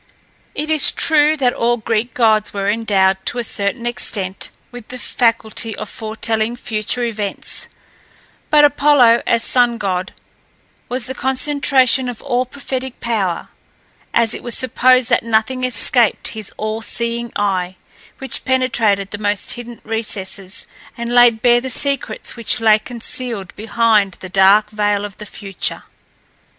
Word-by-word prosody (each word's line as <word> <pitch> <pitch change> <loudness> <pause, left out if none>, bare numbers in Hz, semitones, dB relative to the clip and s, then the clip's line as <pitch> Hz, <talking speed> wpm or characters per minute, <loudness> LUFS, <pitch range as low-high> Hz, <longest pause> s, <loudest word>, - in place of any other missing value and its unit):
It 305 +2 -3
is 310 -3 +5
true 310 -1 +3
that 250 -4 +1
all 240 +1 +1
Greek 225 +1 -2
gods 215 -3 +2
were 200 0 -2
endowed, 195 -3 +1
to - - -2
a 240 - -1
certain 210 +2 -1
extent, 200 -5 -2 0.2
with 245 -3 -11
the 250 - -8
faculty 230 -2 0
of 215 - -7
foretelling 220 +1 -2
future 225 +1 -2
events; 215 -4 -3 0.8
but 300 -1 +6
Apollo, 280 -5 +4
as 230 0 +2
sun 245 -2 +3
god, 185 -3 -2 0.8
was 250 0 -1
the 260 - -4
concentration 265 -1 +1
of 240 - -7
all 255 -2 -1
prophetic 265 -1 -6
power, 200 -8 -2 0.6
as 230 -1 +2
it - - -6
was 240 - +2
supposed 255 0 +3
that - - +4
nothing 230 +3 0
escaped 245 -1 +2
his 215 -3 -7
all 215 +1 -3
seeing 235 +1 -3
eye, 185 -3 -1 0.4
which 270 - -2
penetrated 230 -7 +1
the 205 - -6
most 205 -1 0
hidden 240 -1 -9
recesses, 205 -3 -3 0.3
and 235 0 -4
laid 240 -2 +5
bare 240 -1 +4
the 260 - -5
secrets 270 -3 -2
which 235 +1 0
lay 215 -1 +4
concealed 230 -3 -5
behind 220 -2 +1
the 185 - -9
dark 200 +3 +4
veil 205 -1 0
of 200 -2 -10
the 210 - -8
future. 195 -2 -4
230 Hz, 145 wpm, -18 LUFS, 210-250 Hz, 0.8 s, but